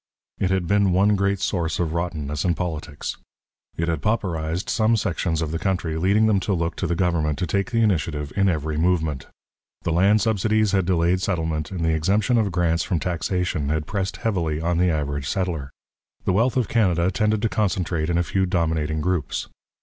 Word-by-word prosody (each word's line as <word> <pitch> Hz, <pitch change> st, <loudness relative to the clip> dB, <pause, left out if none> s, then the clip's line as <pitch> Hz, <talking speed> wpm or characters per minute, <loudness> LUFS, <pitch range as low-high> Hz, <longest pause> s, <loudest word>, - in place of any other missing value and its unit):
It 95 Hz, -, +1 dB
had 95 Hz, -2 st, +1 dB
been 100 Hz, +1 st, +3 dB
one 100 Hz, +3 st, +4 dB
great 100 Hz, 0 st, +1 dB
source 85 Hz, -4 st, -1 dB
of 80 Hz, -3 st, -1 dB
rottenness 80 Hz, -4 st, -2 dB
in 85 Hz, -2 st, +1 dB
politics. 80 Hz, -4 st, -4 dB, 0.6 s
It 85 Hz, -, -1 dB
had 80 Hz, -3 st, -1 dB
pauperized 85 Hz, -5 st, -1 dB
some 110 Hz, 0 st, +2 dB
sections 85 Hz, -5 st, -1 dB
of 75 Hz, -, -3 dB
the 80 Hz, -, -2 dB
country, 90 Hz, -5 st, -1 dB
leading 100 Hz, +6 st, +3 dB
them 105 Hz, -3 st, +3 dB
to 95 Hz, +1 st, -1 dB
look 85 Hz, -1 st, -2 dB
to 95 Hz, -, -1 dB
the 85 Hz, -, 0 dB
government 80 Hz, -4 st, 0 dB
to 90 Hz, -, -1 dB
take 100 Hz, +6 st, -1 dB
the 115 Hz, -1 st, +2 dB
initiative 75 Hz, -7 st, 0 dB
in 100 Hz, -1 st, +3 dB
every 80 Hz, -2 st, -1 dB
movement. 80 Hz, -5 st, 0 dB, 0.6 s
The 85 Hz, -, -1 dB
land 100 Hz, +6 st, +4 dB
subsidies 110 Hz, -1 st, +2 dB
had 95 Hz, -3 st, +1 dB
delayed 90 Hz, 0 st, +2 dB
settlement, 80 Hz, -5 st, -1 dB
and 90 Hz, -4 st, -3 dB
the 80 Hz, -, +2 dB
exemption 105 Hz, +9 st, +2 dB
of 105 Hz, -3 st, 0 dB
grants 85 Hz, -1 st, +1 dB
from 85 Hz, -, -1 dB
taxation 90 Hz, -2 st, -1 dB
had 80 Hz, 0 st, -1 dB
pressed 95 Hz, 0 st, -3 dB
heavily 85 Hz, -9 st, -1 dB
on 85 Hz, +1 st, 0 dB
the 90 Hz, 0 st, +3 dB
average 70 Hz, -3 st, -2 dB
settler. 85 Hz, -8 st, -2 dB, 0.6 s
The 95 Hz, -, +2 dB
wealth 120 Hz, +6 st, +2 dB
of 125 Hz, -5 st, +1 dB
Canada 90 Hz, -6 st, +2 dB
tended 105 Hz, +2 st, 0 dB
to 115 Hz, -, +2 dB
concentrate 85 Hz, -6 st, -1 dB
in 85 Hz, -, +1 dB
a 85 Hz, -, +2 dB
few 95 Hz, +2 st, 0 dB
dominating 80 Hz, -3 st, 0 dB
groups. 85 Hz, -5 st, -2 dB
90 Hz, 195 wpm, -23 LUFS, 80-100 Hz, 0.6 s, one